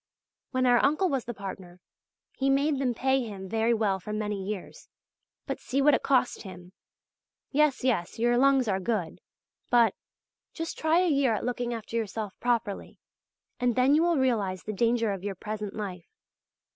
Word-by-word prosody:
When 255 -1 0
our 245 -1 +4
uncle 310 +7 +3
was 270 -4 -1
the 240 - -4
partner, 190 -3 -8 0.6
he 270 0 0
made 280 +1 +2
them 250 -3 0
pay 265 +2 +2
him 200 -4 -7
very 225 +3 +1
well 210 -4 +1
for 210 - -7
many 210 -2 -2
years; 200 -1 -7 0.6
but - - -4
see 275 - -2
what 290 +1 +5
it - - +2
cost 260 -2 +1
him! 180 -2 -11 0.8
Yes, 290 -2 +2
yes, 225 -9 0
your 240 +1 +2
lungs 265 -1 +4
are 190 -2 +1
good, 190 -3 -2 0.5
but... 235 -2 +4 0.6
just 330 -1 -4
try 320 +2 +2
a 365 - +2
year 275 -7 +2
at - - -4
looking 245 -1 -2
after 230 -1 -6
yourself 215 -2 -3
properly, 235 -4 -2 0.6
and 245 -2 +1
then 260 +2 +4
you 305 - +5
will 340 -1 +2
realize 215 -8 0
the 215 - -4
danger 230 +1 +1
of 195 -2 -5
your 200 -1 -3
present 210 +1 -5
life. 185 -5 -6
235 Hz, 175 wpm, -28 LUFS, 205-265 Hz, 0.8 s, what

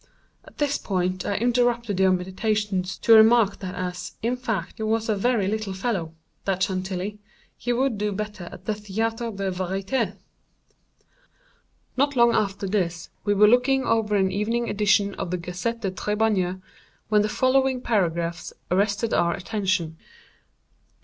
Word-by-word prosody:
At - - -17
this 290 -1 0
point 185 -1 -2
I 200 - 0
interrupted 240 -3 +1
your 190 0 +5
meditations 190 0 -1
to 230 - +4
remark 220 -2 +6
that 185 -1 -6
as, 180 -1 -5
in 240 +2 +1
fact, 225 -9 -3
he - - -8
was 220 +1 0
a 215 - +1
very 215 -1 +1
little 215 -1 -2
fellow—that 190 -2 -3
Chantilly—he 195 +5 -4
would 245 -3 0
do 210 0 0
better 210 -2 -5
at 185 - -12
the 215 - 0
Théâtre 225 +2 -3
des 195 -1 -1
Variétés." 195 +4 -2 1.8
Not 280 +2 +1
long 235 -1 +5
after 200 -1 0
this, 175 -4 -2
we 205 -1 +2
were 210 +1 +6
looking 250 +4 +3
over 220 -2 +1
an 190 -1 +2
evening 230 +4 -1
edition 205 -1 +2
of - - -3
the 180 - -1
"Gazette 180 +7 -4
des 195 - -1
Tribunaux," 200 -2 0 0.5
when 210 -1 +4
the 210 - 0
following 260 +2 +2
paragraphs 170 -7 -1 0.2
arrested 205 +4 +1
our 170 0 +2
attention. 185 -5 -2
205 Hz, 145 wpm, -24 LUFS, 185-225 Hz, 1.8 s, remark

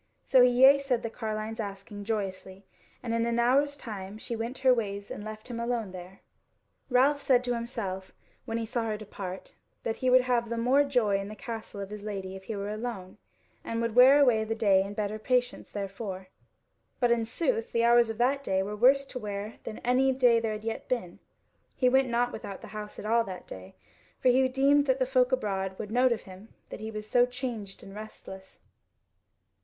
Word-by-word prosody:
So 260 - +5
he 250 - +7
yea 265 +3 +7
said 265 -4 -1
the 230 - -3
carline's 220 0 -4
asking 200 0 -6
joyously, 195 -3 -4 0.4
and 230 -2 -2
in 230 0 +1
an 235 0 0
hour's 275 +4 +2
time 205 -5 -7
she 230 +2 -5
went 230 +3 -4
her 255 - +8
ways 200 -4 -3
and 205 - -6
left 215 0 -8
him 240 -2 -5
alone 235 -4 -2
there. 185 +1 -10 0.7
Ralph 275 +3 +3
said 255 -3 +3
to 245 -1 -1
himself, 225 -6 -4 0.3
when 225 -2 -2
he 230 - -2
saw 230 +1 -2
her 215 -1 -2
depart, 195 -3 -8 0.3
that 225 - -2
he 255 - 0
would 255 0 +7
have 245 -2 0
the 235 - -2
more 255 +5 +4
joy 240 -8 +1
in 195 - -5
the 215 - -8
castle 220 -1 -7
of 195 +1 -7
his 210 -1 -7
Lady 195 -2 -5
if 190 0 -11
he 220 - -4
were 200 +1 -4
alone, 210 -3 -6 0.4
and 230 - -3
would 230 -1 -1
wear 255 +4 +8
away 245 -6 +4
the 225 +1 -2
day 200 -4 +4
in 200 +1 -5
better 215 0 -2
patience 250 +2 0
therefor. 195 -1 -6 0.7
But 245 -1 +3
in 235 -1 +2
sooth 230 0 -1
the 230 - +1
hours 235 0 +5
of 225 - -4
that 270 +4 +1
day 190 -5 0
were 205 +2 -4
worse 265 +5 +4
to 255 - -7
wear 205 0 -5
than 215 - -6
any 260 +2 +3
day 245 -3 +4
there 225 -1 -2
had 215 0 -7
yet 225 0 -5
been. 205 -9 -3 0.6
He 255 - +3
went 265 0 +3
not 240 +1 +1
without 200 -3 -7
the - - -10
house 210 -1 -7
at - - -7
all 230 +2 +3
that 185 -2 -8
day, 95 0 -11 0.4
for 255 - +3
he 260 +1 +4
deemed 280 +2 +3
that 260 0 +3
the 260 - +1
folk 255 0 +2
abroad 195 -6 -1
would 210 -1 -6
note 250 +2 +3
of 235 - 0
him 190 +3 -13 0.2
that - - -6
he 220 +1 -5
was 215 -1 -6
so 245 +2 +4
changed 245 -6 -6
and 195 - -11
restless. 195 -2 -11
225 Hz, 215 wpm, -28 LUFS, 205-250 Hz, 0.7 s, her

